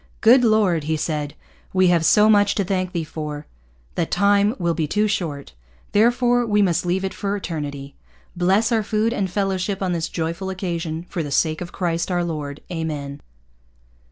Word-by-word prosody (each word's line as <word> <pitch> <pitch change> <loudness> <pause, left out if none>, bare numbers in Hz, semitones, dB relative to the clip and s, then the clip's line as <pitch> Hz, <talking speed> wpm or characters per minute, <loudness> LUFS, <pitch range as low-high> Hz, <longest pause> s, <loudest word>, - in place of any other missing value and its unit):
'Good 245 +3 +6
Lord!' 205 -9 +2
he 160 0 0
said, 150 -2 -3 0.4
'we 185 -1 +4
have 170 -2 +3
so 210 +5 +5
much 205 -2 +4
to 200 - +1
thank 185 -1 -1
Thee 170 -2 -2
for, 150 -1 -6 0.5
that 165 - -1
Time 200 +3 +3
will 170 -2 0
be 160 -2 -1
too 210 +7 +1
short. 150 - -3 0.4
Therefore 245 +3 +3
we 210 -3 +2
must 180 -1 0
leave 190 +2 0
it 190 - -3
for 200 0 -2
Eternity. 145 -6 -5 0.4
Bless 190 +6 +2
our 225 -1 +3
food 220 +2 0
and 195 -5 -1
fellowship 195 0 -1
on 185 - 0
this 165 -2 -2
joyful 170 +3 -3
occasion, 170 -3 -4
for 180 - -3
the 145 - -4
sake 155 +3 +1
of 175 - -6
Christ 170 -1 -2
our 175 -1 0
Lord. 150 -4 -5
Amen!' 150 -4 -4
180 Hz, 180 wpm, -22 LUFS, 160-205 Hz, 0.5 s, Good